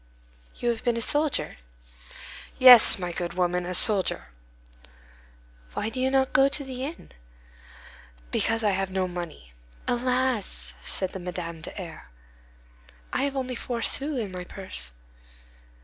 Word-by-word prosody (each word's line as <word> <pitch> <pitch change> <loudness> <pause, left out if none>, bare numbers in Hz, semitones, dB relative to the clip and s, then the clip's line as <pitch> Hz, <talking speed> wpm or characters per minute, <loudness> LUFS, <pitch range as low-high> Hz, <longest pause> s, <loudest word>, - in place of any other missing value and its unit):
"You 240 - -2
have 230 -2 -2
been 240 -2 0
a - - -2
soldier?" 295 +4 0 1.0
"Yes, 255 -3 +9
my 180 -2 -4
good 170 0 -4
woman, 180 0 0
a 180 - 0
soldier." 200 0 +4 1.5
"Why 215 - -2
do 230 - -6
you 260 +1 +1
not 265 0 +1
go 270 +1 +5
to 285 +1 0
the 260 -1 -6
inn?" 310 +5 -7 1.2
"Because 225 0 0
I 210 - +3
have 195 0 -1
no 190 -1 -1
money." 170 - -8 0.3
"Alas!" 250 -3 -1
said 190 -2 -3
Madame 175 -2 -6
de - - -7
R——, 165 - -9 1.0
"I - - 0
have 280 -1 -3
only 255 -1 -3
four 235 -1 -4
sous 280 -1 -1
in 210 -4 -4
my 180 -1 -6
purse." 180 - -9
220 Hz, 140 wpm, -26 LUFS, 180-255 Hz, 1.5 s, Yes